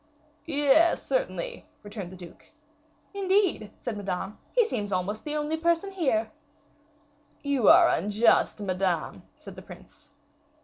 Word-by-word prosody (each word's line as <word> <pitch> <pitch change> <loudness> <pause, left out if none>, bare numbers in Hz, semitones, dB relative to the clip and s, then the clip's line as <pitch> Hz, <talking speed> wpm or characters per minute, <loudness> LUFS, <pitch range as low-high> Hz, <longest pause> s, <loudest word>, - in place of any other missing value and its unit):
"Yes, 295 +2 +3
certainly," - - -3 0.2
returned 205 -3 -7
the - - -10
duke. 175 -2 -14 0.6
"Indeed," 385 - +1
said 240 -3 -4
Madame, 200 0 -5
"he 485 -2 +3
seems 210 - -4
almost 190 +3 -2
the 300 0 -4
only 300 +1 -1
person 340 +4 0
here!" 250 - 0 1.1
"You 280 -5 +1
are 340 +1 +8
unjust, 215 -1 +2
Madame," 185 -3 -2
said - - -12
the - - -10
prince. - - -15
265 Hz, 125 wpm, -27 LUFS, 205-340 Hz, 1.1 s, are